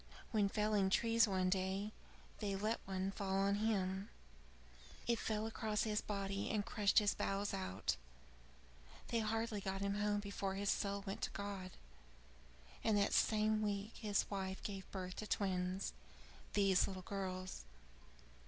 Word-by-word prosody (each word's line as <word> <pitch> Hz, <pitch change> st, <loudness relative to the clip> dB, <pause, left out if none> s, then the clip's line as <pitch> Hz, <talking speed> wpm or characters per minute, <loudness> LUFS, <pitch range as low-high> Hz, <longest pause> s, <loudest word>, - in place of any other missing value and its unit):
When 210 Hz, -4 st, +3 dB
felling 210 Hz, -2 st, +2 dB
trees 230 Hz, +3 st, +4 dB
one 185 Hz, -2 st, +2 dB
day, 190 Hz, +2 st, 0 dB, 0.5 s
they 200 Hz, -2 st, -1 dB
let 215 Hz, +4 st, 0 dB
one 190 Hz, 0 st, -1 dB
fall 195 Hz, -1 st, -2 dB
on 195 Hz, +1 st, +3 dB
him. 195 Hz, -2 st, 0 dB, 1.0 s
It 235 Hz, -1 st, +2 dB
fell 215 Hz, 0 st, 0 dB
across 220 Hz, -1 st, 0 dB
his 210 Hz, -1 st, +1 dB
body 200 Hz, -1 st, -2 dB
and 210 Hz, -2 st, 0 dB
crushed 205 Hz, -2 st, +2 dB
his 205 Hz, -2 st, +6 dB
bowels 200 Hz, +1 st, -1 dB
out. 100 Hz, -, -1 dB, 1.1 s
They 235 Hz, -, +2 dB
hardly 225 Hz, -1 st, 0 dB
got 195 Hz, 0 st, -2 dB
him 200 Hz, +1 st, 0 dB
home 205 Hz, 0 st, +2 dB
before 200 Hz, -1 st, -2 dB
his 200 Hz, 0 st, +1 dB
soul 200 Hz, 0 st, -1 dB
went 200 Hz, +4 st, -4 dB
to -, -, 0 dB
God; 200 Hz, -2 st, -4 dB, 1.1 s
and 220 Hz, -2 st, +4 dB
that 200 Hz, -, +3 dB
same 215 Hz, 0 st, +3 dB
week 205 Hz, 0 st, -1 dB
his 210 Hz, -3 st, +1 dB
wife 190 Hz, -1 st, -3 dB
gave 195 Hz, -2 st, -5 dB
birth 185 Hz, -2 st, -5 dB
to 215 Hz, -, -4 dB
twins 185 Hz, -1 st, 0 dB, 0.6 s
these 195 Hz, -2 st, +4 dB
little 185 Hz, -1 st, -5 dB
girls. 185 Hz, -, -4 dB
200 Hz, 145 wpm, -39 LUFS, 190-210 Hz, 1.1 s, his